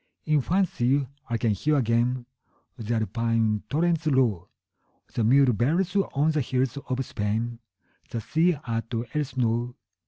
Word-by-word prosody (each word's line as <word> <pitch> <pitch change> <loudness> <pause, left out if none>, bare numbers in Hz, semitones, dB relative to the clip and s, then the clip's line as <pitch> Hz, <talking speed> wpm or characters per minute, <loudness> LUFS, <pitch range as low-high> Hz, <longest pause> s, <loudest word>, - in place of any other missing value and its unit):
In 150 -2 +3
fancy 145 -6 +1 0.2
I 120 - 0
can 115 0 +1
hear 150 +10 +1
again 120 0 +1 0.5
The 115 -1 -3
Alpine 115 -1 0
torrent's 165 +1 +1
roar, 120 - +2 0.7
The 115 - 0
mule 130 +2 +5
bells 160 - +1
on 160 -6 +2
the 155 -1 +1
hills 130 0 0
of 130 0 -1
Spain, 115 +3 -2 0.5
15 - - -34
The 115 - -3
sea 160 - +2
at 115 0 -3 0.2
Elsinore. 125 -4 -1
125 Hz, 135 wpm, -26 LUFS, 115-150 Hz, 0.7 s, mule